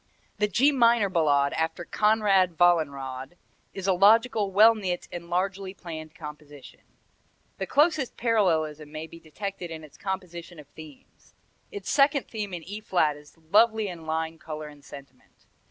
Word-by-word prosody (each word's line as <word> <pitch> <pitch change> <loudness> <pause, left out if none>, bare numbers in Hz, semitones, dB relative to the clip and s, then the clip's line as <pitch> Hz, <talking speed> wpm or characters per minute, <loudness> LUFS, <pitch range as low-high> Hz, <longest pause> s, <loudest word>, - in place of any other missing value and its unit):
The 210 - +2
G 260 +8 +3
minor 235 -6 +3
Ballade 145 -5 +2
after 160 +2 -2
"Konrad 200 -4 +2
Wallenrod," 140 -6 +1 0.4
is 195 - -5
a 195 - +3
logical, 215 +2 +4
well 215 +4 +7
knit 185 -5 -4
and 170 0 -8
largely 190 +2 -2
planned 155 -3 -9
composition. 150 -4 -11 0.8
The 190 - -3
closest 295 - +2
parallelism 160 -10 0
may 155 +1 -6
be 165 +1 -13
detected 180 +3 -6
in 160 -1 -8
its 150 - -15
composition 180 -3 -6
of 150 - -11
themes. 155 -2 -16 0.4
Its 410 -2 -5
second 280 -1 +3
theme 210 -3 -5
in 175 -2 -6
E 205 +5 -7
flat 165 -8 +1
is 150 +2 -17
lovely 220 0 +4
in 165 -3 -9
line, 160 0 -3
color 155 -1 -7
and 145 -1 -16
sentiment. 140 -2 -15
175 Hz, 155 wpm, -26 LUFS, 155-210 Hz, 0.8 s, well